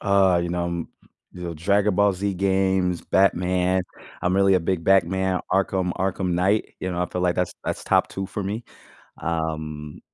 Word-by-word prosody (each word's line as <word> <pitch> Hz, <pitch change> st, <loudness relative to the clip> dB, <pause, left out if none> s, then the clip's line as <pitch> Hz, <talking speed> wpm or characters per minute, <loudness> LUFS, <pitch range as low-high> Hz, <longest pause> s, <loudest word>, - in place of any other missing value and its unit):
Uh, 95 Hz, -3 st, +3 dB
you 85 Hz, -, -2 dB
know, 85 Hz, 0 st, -1 dB
um 85 Hz, -1 st, -3 dB, 0.4 s
you 90 Hz, -, -9 dB
know, 85 Hz, -1 st, -4 dB
Dragon 100 Hz, +4 st, +2 dB
Ball 100 Hz, 0 st, +4 dB
Z 100 Hz, +2 st, -2 dB
games, 95 Hz, -1 st, +1 dB
Batman. 90 Hz, -1 st, +2 dB, 0.4 s
I'm 90 Hz, +1 st, +1 dB
really 95 Hz, 0 st, +4 dB
a 90 Hz, -, +3 dB
big 85 Hz, -1 st, -1 dB
Batman, 95 Hz, 0 st, +2 dB
Arkham 95 Hz, -2 st, +1 dB
Arkham 95 Hz, -1 st, -1 dB
Knight, 95 Hz, +5 st, +1 dB
you 95 Hz, -, -2 dB
know, 90 Hz, 0 st, -1 dB
I -, -, -1 dB
feel 90 Hz, -, -4 dB
like 90 Hz, -1 st, +2 dB
that's 90 Hz, -, -1 dB
that's -, -, -3 dB
top -, -, +3 dB
2 95 Hz, 0 st, -4 dB
for 100 Hz, +1 st, -5 dB
me. 105 Hz, +5 st, -4 dB, 0.6 s
Um 80 Hz, -2 st, -3 dB
90 Hz, 185 wpm, -24 LUFS, 85-95 Hz, 0.6 s, Ball